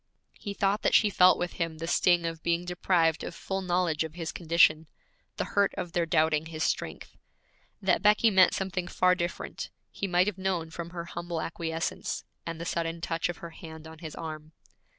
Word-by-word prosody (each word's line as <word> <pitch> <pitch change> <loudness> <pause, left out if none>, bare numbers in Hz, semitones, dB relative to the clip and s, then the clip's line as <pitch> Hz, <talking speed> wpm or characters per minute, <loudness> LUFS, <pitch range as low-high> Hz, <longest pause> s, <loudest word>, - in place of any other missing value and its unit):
He 200 -2 -5
thought 200 +2 +1
that - - +3
she 210 -2 +5
felt 185 -1 +6
with 175 0 -3
him 165 -1 -1
the 165 - -4
sting 175 0 +3
of 165 -1 -4
being 170 +1 0
deprived 170 -3 +1
of 170 - -6
full 195 +2 -3
knowledge 175 -4 +1
of 160 0 -7
his 165 -3 -4
condition, 160 -2 +3 0.5
the - - -1
hurt 200 -1 +3
of 175 -2 -4
their 170 -2 0
doubting 155 0 +2
his 160 -1 -3
strength. - - -3 0.7
That 185 -3 +3
Becky 210 +2 +5
meant 190 -2 +5
something 185 -2 -2
far 185 0 +3
different, 175 -1 -4 0.2
he 200 - -3
might 180 0 +3
have 200 -2 -3
known 180 -4 -1
from 170 +1 -6
her 170 -1 -6
humble 170 0 -4
acquiescence, 165 0 -3 0.2
and 165 -1 -4
the 170 - -5
sudden 165 0 -2
touch 165 +1 -1
of 175 - -4
her 170 - -8
hand 160 -1 -10
on 160 0 -11
his 160 -2 -7
arm. 155 -1 -7
170 Hz, 195 wpm, -29 LUFS, 160-180 Hz, 0.7 s, felt